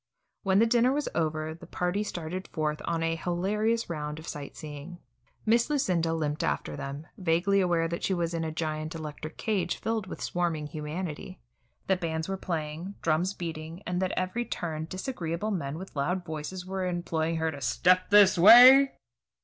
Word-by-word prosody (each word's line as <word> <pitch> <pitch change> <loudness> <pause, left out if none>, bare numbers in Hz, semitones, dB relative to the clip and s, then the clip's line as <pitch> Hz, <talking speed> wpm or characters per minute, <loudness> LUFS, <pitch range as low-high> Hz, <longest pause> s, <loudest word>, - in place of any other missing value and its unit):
When 190 -1 +2
the 225 - +6
dinner 240 +2 +3
was 295 +2 -1
over, 155 -1 -1
the 170 +1 -13
party 180 +3 -1
started 180 -1 -5
forth 150 -1 -2
on 165 -1 -1
a 165 0 0
hilarious 205 +7 0
round 150 -2 -4
of 160 +1 -10
sight 145 -1 -7
seeing. 150 +3 -8 0.5
Miss 230 +4 +3
Lucinda 180 - +1
limped 150 -2 -1
after 75 +1 -1
them, 140 - -6
vaguely 185 +3 +2
aware 170 -2 +2
that 170 +1 -4
she 190 - +1
was 170 -1 -1
in 165 -1 -1
a 160 - -2
giant 155 0 -3
electric 155 0 -7
cage 195 -6 -1
filled 220 -3 -2
with - - -7
swarming 170 -4 -1
humanity, 155 +3 -5 0.5
that 190 -1 +1
bands 160 -1 -2
were 195 - -2
playing, 170 +1 -4
drums 170 +5 +1
beating, 165 +1 -6
and 180 +1 -1
that 185 0 0
at - - -6
every 185 +6 -1
turn 160 -8 -4
disagreeable 185 0 -3
men 155 -6 -3
with 190 -1 -9
loud 175 +6 -1
voices 160 +4 -5
were 190 0 -3
imploring 165 -2 -1
her 160 0 0
to 140 -2 -9
"step 180 +8 +3
this 200 -3 +6
way." 250 +8 +9
170 Hz, 180 wpm, -28 LUFS, 155-190 Hz, 0.5 s, way